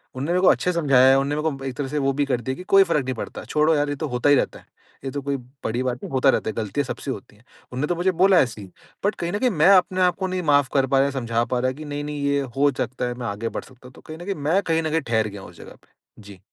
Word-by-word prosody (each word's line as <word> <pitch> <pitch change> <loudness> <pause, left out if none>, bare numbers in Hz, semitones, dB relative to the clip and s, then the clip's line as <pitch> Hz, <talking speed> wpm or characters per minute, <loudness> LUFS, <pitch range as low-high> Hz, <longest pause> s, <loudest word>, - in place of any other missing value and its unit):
उन्होंने 135 +4 -4
मेरे 180 +1 +2
को 190 - +4
अच्छे 180 - +3
समझाया 135 -6 +4
है 135 - +6
उन्होंने 140 +2 0
मेरे 155 -2 -1
को 135 - -9
एक 130 -2 -4
तरह 145 -2 -2
से 150 +2 -4
वो 135 -1 +1
भी 145 +1 0
कर 130 -3 -1
दिया 130 +3 -3
की 180 - -9
कोई 195 +1 +5
फर्क 165 -6 0
नहीं 130 0 -3
पड़ता, - - -7
छोड़ो 155 +1 +2
यार 145 0 0
ये 145 - -2
तो 155 +2 -4
होता 125 +1 0
ही 145 - +7
रहता - - -1
है, - - -22 0.4
ये 135 - -3
तो 140 - -4
कोई 140 0 -2 0.3
बड़ी 120 +3 -1
बात 125 -1 -2
नहीं - - -7
होता 135 +1 +3
रहता 120 - +1
है - - -4
गलतियाँ 115 +6 -2
सबसे 135 - -5
होती 105 -2 -9
है, 110 - -24 0.3
उन्होंने 130 +4 -2
तो 175 - 0
मुझे 180 +2 +1
बोला 190 -1 +6
ऐसे 115 -4 0
ही। 95 - -10 0.4
बट 205 - +1
कहीं 170 0 -3
न 205 - -1
कहीं 255 +1 +2
मैं 160 -2 +3
अपने 185 +1 0
आपको 180 +1 +1
नहीं 185 0 -2
माफ 145 -2 +4
नहीं 135 - +5
कर 130 - -2
पा 135 - +2
रहा 135 - +4
है, 140 - -3
समझा 115 -3 -1
पा 125 0 -1
रहा 130 - 0
है 130 - -4
की 155 +1 -9
नहीं, 145 0 -4
नहीं 145 -1 -5
ये 140 0 +1 0.2
हो 145 +1 +4
सकता 125 0 -2
है 125 - -3
मैं 120 -1 -6
आगे 110 +2 -3
बढ़ - - -5
सकता 130 -1 -16
हूँ। 130 - -16
तो - - -16
कहीं 155 - -10
न 175 - -10
कहीं 200 0 -2
मैं 155 +7 +1
कहीं 165 0 +1
न 160 - -1
कहीं 160 +1 0
ठहर 110 -5 0
गया 100 -1 -9
हूँ 95 - -11
उस 85 - -17
जगह - - -12
पे। - - -28 0.3
जी। 100 -2 -13
140 Hz, 340 wpm, -23 LUFS, 125-160 Hz, 0.4 s, ही